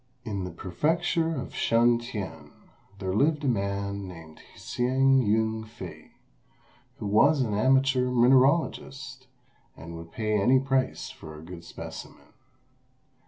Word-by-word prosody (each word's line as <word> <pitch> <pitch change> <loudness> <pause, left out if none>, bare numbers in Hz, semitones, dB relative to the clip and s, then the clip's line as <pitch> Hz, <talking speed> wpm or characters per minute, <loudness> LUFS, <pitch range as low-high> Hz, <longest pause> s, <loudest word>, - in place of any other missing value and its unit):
In 100 -5 -3
the - - -5
prefecture 160 - 0
of 130 - -7
Shun 120 +1 +3
t'ien 110 -5 -7 0.5
there 95 -1 -3
lived 150 +7 +2
a - - 0
man 100 -3 -2
named 80 -3 -11 0.2
Hsing 130 +2 +2
Yün 110 +1 0
fei, 115 - -10 0.9
who - - -6
was 135 +9 +4
an 115 -5 -1
amateur 130 +3 +3
mineralogist 130 +1 +2 0.5
and 85 +3 -9
would 85 0 -10
pay 110 -2 0
any 130 +6 +5
price 135 -1 -1
for 80 -1 -11
a 75 - -11
good 85 0 -10
specimen. - - -10
120 Hz, 125 wpm, -27 LUFS, 100-135 Hz, 0.9 s, any